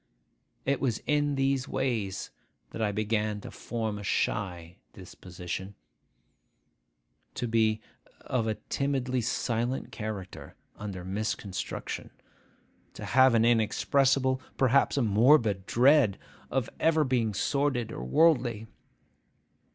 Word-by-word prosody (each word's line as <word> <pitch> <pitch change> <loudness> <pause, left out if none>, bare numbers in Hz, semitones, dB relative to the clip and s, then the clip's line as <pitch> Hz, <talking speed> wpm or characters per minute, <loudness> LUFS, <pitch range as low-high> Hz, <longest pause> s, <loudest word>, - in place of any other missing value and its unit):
It 140 +1 0
was 120 -6 +1
in 145 -1 +1
these 135 -1 0
ways 110 -8 -2 0.4
that 115 - -6
I 105 -2 +1
began 105 0 -1
to - - -9
form 110 -3 -4
a - - -8
shy 90 -3 -2 0.2
disposition; 90 +1 -7 1.6
to 120 - -2
be 110 -1 +2 0.4
of 115 -3 -1
a 110 - 0
timidly 130 -1 -1
silent 120 +2 -2
character 105 -4 -7 0.2
under 95 -4 -7
misconstruction; 100 -1 -4 0.9
to - - -7
have 130 -1 +5
an 115 0 +4
inexpressible, 130 +3 +2 0.2
perhaps 135 +2 +3
a 135 - +3
morbid, 110 -2 +4
dread 130 -4 +4 0.3
of 130 -3 -1
ever 160 -1 +3
being 120 -6 0
sordid 135 -1 0
or 60 - -6
worldly. 120 - +2
115 Hz, 110 wpm, -28 LUFS, 105-130 Hz, 1.6 s, have